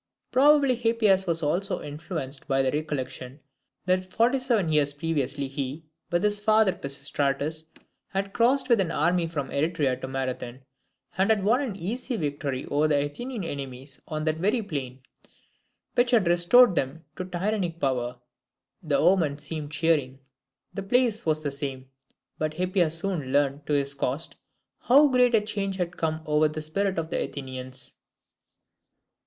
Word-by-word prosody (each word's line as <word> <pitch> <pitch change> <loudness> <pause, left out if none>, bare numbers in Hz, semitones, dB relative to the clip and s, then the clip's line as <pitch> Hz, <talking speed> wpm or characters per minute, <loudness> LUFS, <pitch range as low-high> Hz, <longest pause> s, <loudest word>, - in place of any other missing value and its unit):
Probably 280 0 +5
Hippias 225 -5 +2
was 165 -1 0
also 180 +7 0
influenced 145 -2 -6
by 135 -1 +2
the 130 - +1
recollection, 145 -3 -4 0.5
that 185 0 0
forty 240 +6 +2
seven 235 -9 +1
years 145 -2 +2
previously 145 -2 -1
he, 135 +3 -5 0.2
with 175 +2 0
his 205 0 +2
father 215 -2 +4
Pisistratus, 140 0 -2 0.4
had 195 0 -3
crossed 255 +4 +3
with 235 -3 +4
an 185 -3 +1
army 170 +2 +1
from 145 -5 -4
Eretria 145 -3 +1
to - - -4
Marathon, 130 -1 -4 0.6
and 190 - +3
had 215 -3 +3
won 235 +7 +3
an 245 -8 -3
easy 230 +7 -3
victory 145 -4 -3
over 150 +2 +3
their 145 -2 +2
Athenian 235 - -5
enemies 135 -3 -6
on 155 0 -3
that 155 0 0
very 210 +7 +1
plain, 135 -8 -5 0.9
which 245 0 +3
had 225 -7 +3
restored 175 +7 +6
them 150 +1 -2
to 185 - -4
tyrannic 180 -1 -2
power. 125 -3 -1 0.6
The 150 -5 +1
omen 160 -4 +3
seemed 150 0 -6
cheering. 145 -4 +1 0.6
The 195 - -4
place 225 0 +1
was 155 0 +1
the 145 - -1
same; 135 -2 -5 0.5
but 155 0 -1
Hippias 180 -3 +1
soon 165 -7 -2
learned 145 0 +1
to 150 - 0
his 140 -1 +1
cost 140 +3 -3 0.4
how 285 +4 +5
great 250 -2 +4
a 220 - +4
change 200 -2 -2
had 175 -2 -3
come 160 -1 -2
over 150 0 +3
the 155 0 -5
spirit 190 +5 -1
of 160 -1 -3
the - - 0
Athenians. 130 -1 -7
160 Hz, 155 wpm, -26 LUFS, 140-195 Hz, 0.9 s, restored